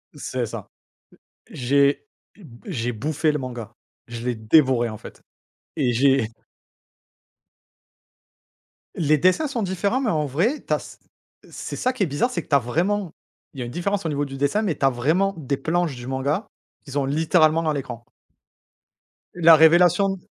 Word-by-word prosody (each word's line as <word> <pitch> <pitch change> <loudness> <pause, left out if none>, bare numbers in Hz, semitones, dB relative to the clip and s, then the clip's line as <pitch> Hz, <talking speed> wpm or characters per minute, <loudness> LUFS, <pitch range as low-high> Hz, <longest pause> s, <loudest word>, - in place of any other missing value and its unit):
C'est - - -3
ça. - - -8 0.8
J'ai 140 - +1 0.3
b 140 - -15
j'ai 120 - -2
bouffé 150 +6 -1
le 150 - -2
manga, 120 -4 -7 0.3
je 115 0 -7
l'ai 125 -1 -1
dévoré, 120 +1 +3
en 110 -1 -7
fait. - - -13 0.5
Et 130 -5 +1
j'ai 130 -2 +3 2.7
Les 155 -2 +2
dessins 185 - +2
sont 240 -6 -3
différents 200 +7 -1
mais 235 - 0
en 155 -3 0
vrai, 180 - -1
tu - - -1
as - - +1
c - - -12 0.5
c'est - - -6
ça 255 +1 0
qui 255 - -8
est - - +3
bizarre, 150 - 0
c'est 170 - -2
que - - -27
tu 140 - +4
as - - +6
vraiment 175 - -1 0.4
il 135 - -10
y - - -2
a - - -5
une 120 - -7
différence 195 +4 -2
au - - 0
niveau 145 0 -1
du 135 -1 -8
dessin 145 +10 +1
mais 175 -7 -1
tu 140 - -8
as - - +6
vraiment 160 +11 +1
des 140 -2 -2
planches 160 0 -1
du 120 +1 -9
manga 140 +9 -2 0.4
qu'ils 140 0 -6
ont 140 - +1
littéralement 160 +2 +3
dans 155 -1 0
l'écran. 120 -4 -6 1.3
La 165 -2 +7
révélation 175 +4 +4
150 Hz, 175 wpm, -23 LUFS, 130-180 Hz, 2.7 s, La